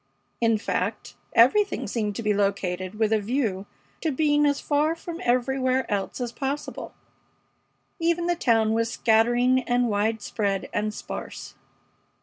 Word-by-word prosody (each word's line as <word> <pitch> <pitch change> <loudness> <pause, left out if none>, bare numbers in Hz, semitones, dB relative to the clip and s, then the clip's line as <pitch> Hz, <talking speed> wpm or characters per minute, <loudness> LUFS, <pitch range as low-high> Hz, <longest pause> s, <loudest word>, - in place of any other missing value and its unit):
In 230 -1 +3
fact, 210 - -3 0.2
everything 275 - +4
seemed 210 -3 -2
to 230 - -4
be 210 -1 +2
located 195 -2 -1
with 220 0 +1
a 220 - +3
view 210 -3 -2 0.3
to 320 - 0
being 295 +1 +3
as 285 -1 +1
far 300 +2 +1
from 335 +1 -7
everywhere 255 +1 +1
else 200 +3 -2
as 245 -2 -3
possible. 275 +3 -5 1.0
Even 340 +1 +1
the 350 0 +1
town 225 -8 +2
was 230 0 +1
scattering 240 +3 +3
and 245 -1 +1
widespread 205 -1 -1
and 210 +1 0
sparse. - - -7
235 Hz, 135 wpm, -25 LUFS, 210-275 Hz, 1.0 s, everything